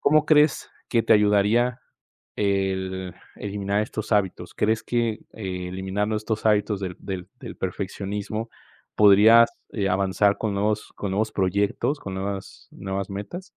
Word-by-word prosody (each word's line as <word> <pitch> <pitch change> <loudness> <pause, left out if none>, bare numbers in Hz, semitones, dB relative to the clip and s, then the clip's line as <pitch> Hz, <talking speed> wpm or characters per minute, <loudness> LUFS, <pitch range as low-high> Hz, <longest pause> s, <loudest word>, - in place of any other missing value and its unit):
¿Cómo 155 0 +4
crees 150 -1 +3 0.2
que 115 -2 +2
te - - +3
ayudaría 105 +4 +3 0.6
el 95 -2 -1 0.2
eliminar 100 0 -2
estos 110 0 -5
hábitos? 100 -3 0
¿Crees 110 +1 +1
que 115 -3 0
eliminando 95 +2 -3
estos 110 0 -2
hábitos 105 -1 +2
del 90 -2 -5
del 95 -2 -6
del - - -8
perfeccionismo 100 +4 -4 0.5
podrías, 105 +3 +7 0.2
eh, 100 -3 -1
avanzar 100 +2 +2
con 105 -3 -2
nuevos 105 +2 -1
con 100 - -4
nuevos 110 +2 0
proyectos, 100 - 0
con 95 -1 -6
nuevas 95 -10 -6
nuevas 95 0 -4
metas? 105 - -6
100 Hz, 135 wpm, -24 LUFS, 95-110 Hz, 0.6 s, podrías